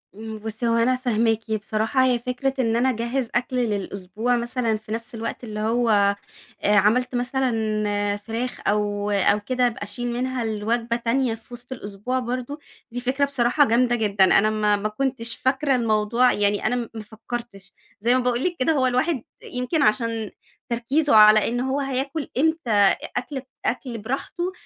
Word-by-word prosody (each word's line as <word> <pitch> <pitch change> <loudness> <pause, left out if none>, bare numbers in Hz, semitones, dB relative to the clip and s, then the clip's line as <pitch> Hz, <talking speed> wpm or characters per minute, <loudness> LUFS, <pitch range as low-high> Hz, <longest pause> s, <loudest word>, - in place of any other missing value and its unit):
امم، 220 +1 -7
بُصّي 220 +2 -4
هو 230 - +2
أنا 240 +2 +3
فاهماكِ 225 -3 0
بصراحة، 220 +4 0
هي 250 -2 +2
فكرة 250 +3 -2
إن 230 -2 +2
أنا 245 +3 +3
أجهّز 235 +1 -2
أكل 250 +1 0
للأسبوع 210 0 -1
مثلًا 235 -2 -1
في 215 0 -13
نفس 230 +1 -5
الوقت، 230 +2 -5
اللي 215 -2 -5
هو 230 +2 +1 0.7
آآ 210 - +3
عملت 245 +6 +3
مثلًا 215 -5 0
فراخ 230 +4 -5
أو 205 0 0
أو 205 +1 +3
كده 250 +4 +1
أبقى 230 -3 -5
أشيل 240 +4 -5
منها 250 0 -2
لوجبة 230 +2 -1
تانية 235 0 0
في 230 +2 -17
وِسط 245 +2 -10
الأسبوع، 220 +2 -3
برضه 255 +4 -4 0.3
دي 245 +1 -4
فكرة 265 +3 +1
بصراحة 275 +1 +2
جامدة 240 +2 +3
جدًا، 205 -4 +2
أنا 205 +3 +4
ما 210 -1 +2
ما 205 +1 -2
كنتش 230 0 -2
فاكرة 270 +1 +1
الموضوع 230 +1 +2
يعني 205 0 +1
أنا 245 - +2
م 240 -2 -3
ما 225 - -6
فكرتش، 220 -2 -8 0.3
زي 235 +3 +3
ما - - +3
باقول 245 +1 0
لِك 360 -1 0
كده، 255 - +2
هو 260 -3 +2
الواحد 255 +1 0 0.2
يمكن 250 +6 -2
عشان 225 -1 +1 0.4
تركيزه 245 +4 +1
على 215 0 +7
إن 240 +1 -1
هو 265 +2 -1
هياكل 275 +2 -2
إمتى 320 -2 +1
أ 205 -2 +5 0.2
أكل 265 +1 -3 0.2
أكل 245 -1 -2
براحته، 270 - -3
235 Hz, 170 wpm, -23 LUFS, 215-255 Hz, 0.7 s, على